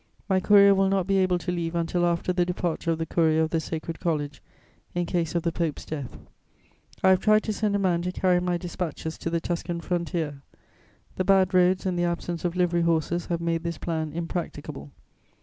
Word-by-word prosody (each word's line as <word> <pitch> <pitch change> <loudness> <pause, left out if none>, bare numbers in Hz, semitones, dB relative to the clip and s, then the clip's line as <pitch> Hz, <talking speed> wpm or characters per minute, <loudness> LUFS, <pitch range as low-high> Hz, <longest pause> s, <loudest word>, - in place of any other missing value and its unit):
My 190 -3 +3
courier 200 +1 +6
will 195 0 +2
not 195 -2 +1
be 195 +1 +2
able 185 -1 +2
to 180 +1 -3
leave 170 -1 -2
until 170 +1 +1
after 170 +1 0
the 180 -1 +2
departure 175 -2 -2
of 165 - +1
the 165 - -2
courier 160 -1 +2
of 160 - -2
the 165 - +1
Sacred 160 0 -5
College, 150 -5 -2 0.5
in 175 0 0
case 170 -2 -1
of 170 - +1
the 170 - 0
Pope's 165 -3 -3
death. 145 -5 -6 0.9
I 190 - +6
have 185 - +5
tried 215 +2 +4
to 215 - -2
send 210 -1 0
a - - +3
man 180 -4 +1
to 180 +1 -2
carry 180 -1 +2
my 180 0 0
dispatches 170 -2 -5
to - - -3
the 170 0 0
Tuscan 170 0 -3
frontier. 170 -5 -2 0.8
The 185 - +1
bad 190 -1 +3
roads 185 +1 +3
and 180 -2 0
the 175 - +2
absence 170 0 -3
of 175 -1 -1
livery 175 -1 +2
horses 170 +1 0
have 170 -1 -2
made 165 -1 0
this 170 -1 -4
plan 160 -2 -3
impracticable. 165 - -5
175 Hz, 210 wpm, -26 LUFS, 165-185 Hz, 0.9 s, courier